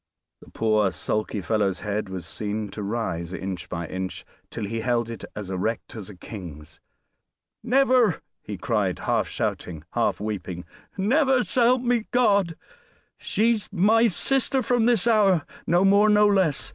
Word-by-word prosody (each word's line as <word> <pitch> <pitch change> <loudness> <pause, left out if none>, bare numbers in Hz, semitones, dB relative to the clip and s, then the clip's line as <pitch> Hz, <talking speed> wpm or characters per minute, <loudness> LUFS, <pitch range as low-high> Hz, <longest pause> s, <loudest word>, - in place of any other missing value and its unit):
The - - -16
poor 110 -3 +1
sulky 105 +1 -2
fellow's 100 -1 0
head 105 -1 -3
was 95 -3 -6
seen 105 +3 -4
to 105 - -7
rise 100 -5 -3
inch 95 -2 -5
by 85 -1 -4
inch 95 +2 -5 0.2
till 110 - -5
he 115 +3 -3
held 120 0 0
it 115 - -8
as 100 -2 -6
erect 110 +7 -3
as 105 -4 -8
a 105 - -10
king's. 85 -6 -10 0.8
"Never!" 250 - +3 0.2
he 105 -1 -7
cried, 100 -3 -1
half - - 0
shouting, 80 -4 -4
half - - 0
weeping. 95 -4 -5 0.3
"Never, 260 +5 +3
s'help 245 +1 +2
me 240 -2 0
God! 200 -8 +2 0.6
She's 220 +1 0
my 215 +5 +4
sister 265 +5 +1
from 240 -1 +2
this 235 -4 +3
hour 200 -8 +3 0.2
no 175 +4 +3
more, 200 +2 +5
no 210 0 +5
less. 190 -8 +2
115 Hz, 150 wpm, -24 LUFS, -, 0.8 s, more